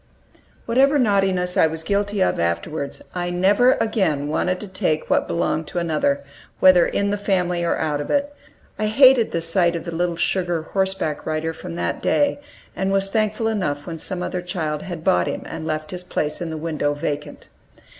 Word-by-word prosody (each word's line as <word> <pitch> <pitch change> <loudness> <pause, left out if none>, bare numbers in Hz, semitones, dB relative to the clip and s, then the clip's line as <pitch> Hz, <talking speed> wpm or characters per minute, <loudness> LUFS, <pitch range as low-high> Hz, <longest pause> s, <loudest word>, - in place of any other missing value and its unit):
Whatever 270 +5 +3
naughtiness 195 -6 +1
I - - +5
was 160 0 -5
guilty 200 +1 0
of - - 0
afterwards, 140 - -2
I 175 -1 -2
never 200 +8 +4
again 165 -10 0
wanted 180 +4 0
to 210 - -6
take 185 -5 -1
what - - +2
belonged 160 -2 -1
to - - -7
another, 150 -4 0 0.4
whether 185 -2 +6
in 200 0 0
the 205 - -1
family 180 -3 0
or 170 - +1
out 150 -2 -1
of 145 - -6
it. 285 0 0 0.5
I 215 - +1
hated 255 +1 +5
the 170 - 0
sight 170 +1 +2
of 165 - -4
the 170 - -5
little 175 +1 0
sugar 175 -2 0
horseback 190 -4 -2
rider 155 +1 -1
from 85 - -8
that 85 0 -2
day, 285 -1 +2 0.4
and 190 0 -1
was 195 0 +2
thankful 215 +1 0
enough 150 -10 -1
when 165 -2 -6
some 180 +2 -3
other 180 - -3
child 160 -4 -3
had 175 -4 -7
bought 90 - +2
him - - -3
and 160 - -6
left 155 0 -3
his 180 -1 -5
place 150 -3 -3
in 170 - -3
the 160 - -4
window 155 -2 -1
vacant. 145 0 -5
175 Hz, 190 wpm, -22 LUFS, 155-200 Hz, 0.5 s, whether